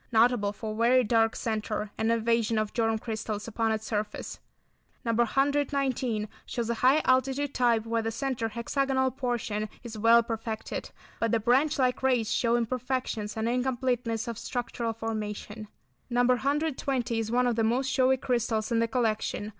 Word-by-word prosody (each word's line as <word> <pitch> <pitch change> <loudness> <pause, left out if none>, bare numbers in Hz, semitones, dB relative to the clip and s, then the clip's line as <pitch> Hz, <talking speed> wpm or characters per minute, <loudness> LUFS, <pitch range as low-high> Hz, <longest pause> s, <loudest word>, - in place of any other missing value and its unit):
Notable 225 -2 +3
for 215 +1 -5
very 245 +3 +4
dark 225 0 +2
centre, 215 -2 -2
and 220 +1 +1
invasion 230 -1 +1
of 215 -1 -1
germ 225 -2 +1
crystals 220 -1 -4
upon 225 0 0
its 220 0 -2
surface. 210 -1 -4 0.7
No. 230 - +1
119 265 -2 +1 0.2
shows 235 -1 -3
a 235 - -4
high 270 +5 +5
altitude 265 +2 +2
type 235 -3 +2
where 230 0 0
the 225 - -2
centre 235 -1 -2
hexagonal 260 +3 0
portion 230 -5 -2
is 225 -3 -7
well 230 +2 +6
perfected, 225 -1 -4 0.3
but 230 -1 +1
the 230 - +3
branch 260 +7 +2
like 255 -2 +1
rays 245 -4 +2
show 235 -1 +2
imperfections 240 -3 -2
and 220 +1 0
incompleteness 245 -2 -1
of 230 -2 -4
structural 235 -1 -3
formation. 215 -1 -5 0.4
No. 245 0 +2
120 265 -2 0
is 220 -1 -2
one 250 +1 +3
of 240 -2 +1
the 225 - +1
most 240 +4 +1
showy 265 -1 +3
crystals 235 -3 -1
in 230 - +2
the 230 - +2
collection. 220 -3 -1
235 Hz, 160 wpm, -28 LUFS, 220-255 Hz, 0.7 s, well